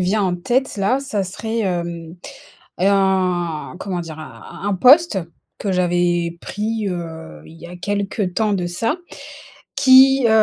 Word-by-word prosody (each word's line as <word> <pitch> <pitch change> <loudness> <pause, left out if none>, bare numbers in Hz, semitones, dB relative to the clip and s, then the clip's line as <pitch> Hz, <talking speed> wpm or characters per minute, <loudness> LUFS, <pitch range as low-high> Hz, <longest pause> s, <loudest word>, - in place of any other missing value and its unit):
vient 200 +3 +1
en 180 -2 0
tête 245 +8 -1
là, 205 +7 +1
ça 245 -8 -2
serait 220 +5 -4
hem, 170 -3 -3 0.6
un, 185 -4 +1
comment 185 -3 -3
dire? 160 -2 -8
Un 155 - -11 0.2
un - - 0
un - - +1
poste 255 - +5 0.4
que 200 - -3
j'avais 175 -1 0
pris, 215 0 -3
heu, 160 - -7
il 165 - -14
y 170 - -9
a 180 - -9
quelques 200 0 -2
temps 215 -2 +1
de 180 -2 -2
ça. 225 - -1 0.8
Qui, 265 -1 +6
heu, - - +2
190 Hz, 155 wpm, -20 LUFS, 175-220 Hz, 0.8 s, Qui